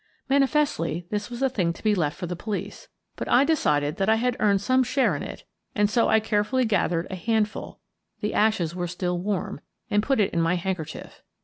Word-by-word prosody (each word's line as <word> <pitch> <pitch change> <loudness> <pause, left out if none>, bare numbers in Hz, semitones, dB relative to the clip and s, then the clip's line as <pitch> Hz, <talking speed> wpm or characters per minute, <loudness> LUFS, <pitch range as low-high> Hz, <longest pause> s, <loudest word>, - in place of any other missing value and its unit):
Manifestly, 275 - +1
this 210 +1 -2
was 240 +2 -4
a - - +5
thing 185 -9 0
to - - -15
be 215 -1 +3
left 155 -7 0
for 180 - -4
the 175 +1 -4
police, 210 +4 -5 0.3
but - - -5
I 255 - +6
decided 150 - +1
that 195 +2 +1
I 220 - +5
had 245 +2 0
earned 200 -2 +3
some 255 +6 +2
share 260 +2 +1
in - - -4
it, - - -7 0.3
and 205 -1 +2
so 235 0 +3
I 220 - +5
carefully 220 +4 +1
gathered 180 -5 +1
a - - -3
handful 215 +2 -1 0.2
— - - -52
the 210 - -1
ashes 205 -7 +2
were 175 -1 -3
still 180 0 -2
warm 200 +1 -3
— - - -39
and 205 0 +3
put 270 +2 +1
it 205 - +2
in 170 - +1
my 165 +2 +2
handker 175 -3 -3
chief. - - -10
210 Hz, 225 wpm, -25 LUFS, 180-230 Hz, 0.3 s, I